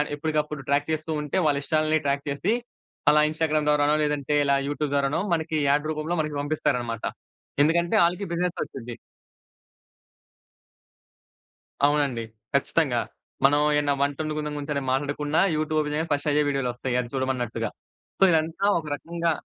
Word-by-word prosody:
ఎప్పటికప్పుడు 150 -1 -2
ట్రాక్ 145 +2 +1
చేస్తూ 155 +1 -2
ఉంటే, 150 +4 -2
వాళ్ళ 145 -1 +2
ఇష్టాలను 155 0 +1
ట్రాక్ 140 0 0
చేసి, 170 +10 0 0.6
అలా 150 0 +5
ఇన్‌స్టాగ్రామ్ 155 -1 0
ద్వారానో 150 0 +3
లేదంటే, 150 0 0
ఇలా 140 0 +3
యూట్యూబ్ 145 0 -2
ద్వారానో, 140 +4 +1
మనకి 160 -1 -1
యాడ్ 145 +2 +2
రూపంలో 155 +3 -2
మనకి 150 -1 -3
పంపిస్తారన్నమాట. 125 -6 -1 0.6
ఎందుకంటే 170 +2 +2
ఆళ్ళకి 180 +4 -1
బిజినెసొచ్చుది. 165 -8 -3 2.9
అవునండి. 145 -4 +2 0.3
ఖచ్చితంగా. - - +2 0.5
మనం 145 +2 +5 0.2
ఏమైనా 145 -1 +2
వంట 140 0 0
వండుకుందం 155 -1 -3
గురించి 145 -1 -3
మాట్లాడకున్న 145 +2 -1 0.2
యూట్యూబ్‌లో 155 0 0
ఓపెన్ 150 0 -3
చెయ్యగానే 160 +2 -2
ఫస్ట్ 145 +1 -1
అయ్యే 150 +1 +3
వీడియోలు 135 -3 0
వస్తాయి 125 +1 -3
అది 120 - -8
చూడమన్నట్టుగా. 130 -2 -1 0.5
సో - - +5
ఇదంతా 165 +4 +1
ఒక 160 - -9
రకంగా 170 +2 -2
150 Hz, 135 wpm, -25 LUFS, 140-155 Hz, 2.9 s, అలా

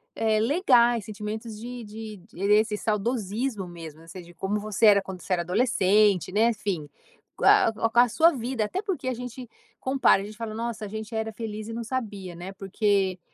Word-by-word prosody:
eh, 220 -1 +2
legais, 240 - +3
sentimentos 215 +1 -6
de 245 +1 -7
de 215 0 -8
de 205 -1 0
esse 215 0 +3
saudosismo 215 0 -2
mesmo, 165 -3 -10
ou 165 - -17
seja, 175 0 -10
como 205 +2 -2
você 215 +1 0
era 200 -1 +6
quando 190 -2 -8
você 190 - -2
era 175 - +1
adolescente, 200 -2 +3
né, 220 +4 +3
enfim. 195 -8 -3 0.5
Co - - -3
a - - +6
co 215 - -13
a 225 - +3
com 235 +1 +3
a 245 - +7
sua 330 +8 +5
vida, 245 -3 -2
até 365 - -3
porque 380 -10 -3
a 255 - +1
gente 245 0 -8 0.3
compara, 260 -7 +3
a - - -6
gente 210 +1 -10
fala, 225 -2 -5
nossa, 225 -1 -4
a - - -5
gente 220 +2 -6
era 220 0 -2
feliz 215 -1 -6
e 230 - -6
não 235 - -4
sabia, 210 -7 -5
né, 180 +3 -8
porque 195 -1 0
215 Hz, 205 wpm, -26 LUFS, 195-235 Hz, 0.5 s, a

